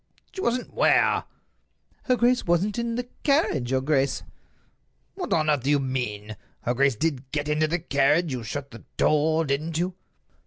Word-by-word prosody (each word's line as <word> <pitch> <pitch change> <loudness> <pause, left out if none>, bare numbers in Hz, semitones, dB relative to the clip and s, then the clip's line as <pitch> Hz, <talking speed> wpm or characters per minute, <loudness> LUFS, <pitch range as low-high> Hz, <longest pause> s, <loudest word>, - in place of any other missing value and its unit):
"She 375 - -6
wasn't 245 -3 -1
where?" - - +3 0.8
"Her 255 - +3
grace 245 +1 +2
wasn't 190 +6 +1
in 235 -1 -2
the 245 +1 -3
carriage, 275 - +1
your 130 0 +1
grace." 135 -1 +1 0.9
"What - - -6
on 155 -1 +2
earth 150 -3 +2
do 135 - -2
you 145 - +4
mean?" 110 -6 -3 0.2
"Her 120 - -1
grace 135 0 +2
did 135 -1 -2
get 145 -1 -2
into 150 +1 +1
the 170 +3 0
carriage; 155 0 +2
you 125 -2 -3
shut 140 +5 -6
the 115 - -12
door, 155 +2 +2
didn't 155 +3 -2
you?" 180 +2 -1
150 Hz, 170 wpm, -25 LUFS, 135-175 Hz, 0.9 s, you